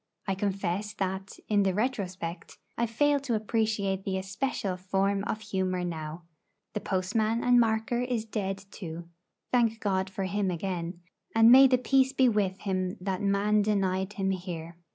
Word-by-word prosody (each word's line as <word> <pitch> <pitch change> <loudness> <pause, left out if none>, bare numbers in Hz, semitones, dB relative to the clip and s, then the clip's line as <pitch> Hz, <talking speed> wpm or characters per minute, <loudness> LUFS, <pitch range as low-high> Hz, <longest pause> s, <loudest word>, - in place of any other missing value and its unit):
I 195 - 0
confess 195 +1 -2
that, 190 0 -3
in 205 -1 +3
the 190 -2 +1
retrospect, 185 -7 -3 0.2
I 235 - 0
fail 290 +5 +2
to 265 -4 -1
appreciate 215 -3 0
the 190 -1 -1
especial 195 0 -2
form 195 +2 0
of 215 - -3
humour 185 -4 -1
now. 160 0 -5 0.5
The 210 - -1
postman 215 +5 0
and 245 0 +5
marker 225 +1 +1
is 245 -3 -1
dead 195 -3 -3
too, 170 -2 -7 0.4
thank 230 -3 +2
God 190 -2 0
for 195 0 -4
him 195 +1 0
again, 175 -1 -3 0.3
and 225 +1 +7
may 265 +2 +9
the 255 -1 +4
peace 265 +1 +2
be 260 -2 +4
with 200 -4 0
him 185 -2 -2
that 185 0 -2
man 205 +1 +2
denied 195 -1 0
him 195 -1 0
here! 175 -3 -5
195 Hz, 160 wpm, -28 LUFS, 185-220 Hz, 0.5 s, may